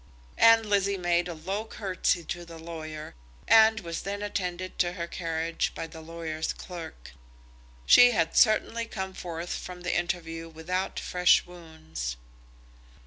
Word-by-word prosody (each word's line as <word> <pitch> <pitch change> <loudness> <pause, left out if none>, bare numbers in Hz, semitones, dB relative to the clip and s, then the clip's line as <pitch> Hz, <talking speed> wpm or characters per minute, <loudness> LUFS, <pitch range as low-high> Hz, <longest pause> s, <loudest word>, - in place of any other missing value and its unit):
And 230 -1 +7
Lizzie 200 -1 +1
made 175 -1 +1
a 175 - -5
low 190 +7 -3
curtsey 190 -5 -1
to 175 +2 -5
the 170 -1 -11
lawyer, 155 -2 -7 0.3
and 220 -1 +6
was 170 -2 -5
then 200 +1 -4
attended 185 -3 -4
to 175 -1 +2
her 170 -2 -4
carriage 165 -1 -2
by - - -4
the 160 0 -11
lawyer's 160 -1 -4
clerk. 165 - -9 0.7
She 245 - +8
had 165 -8 0
certainly 230 +1 +3
come 190 -3 -5
forth 175 -1 -5
from 180 -1 -7
the 175 - -1
interview 165 -2 -3
without 175 +4 -3
fresh 180 0 +3
wounds. 160 - -7
175 Hz, 140 wpm, -28 LUFS, 165-190 Hz, 0.7 s, She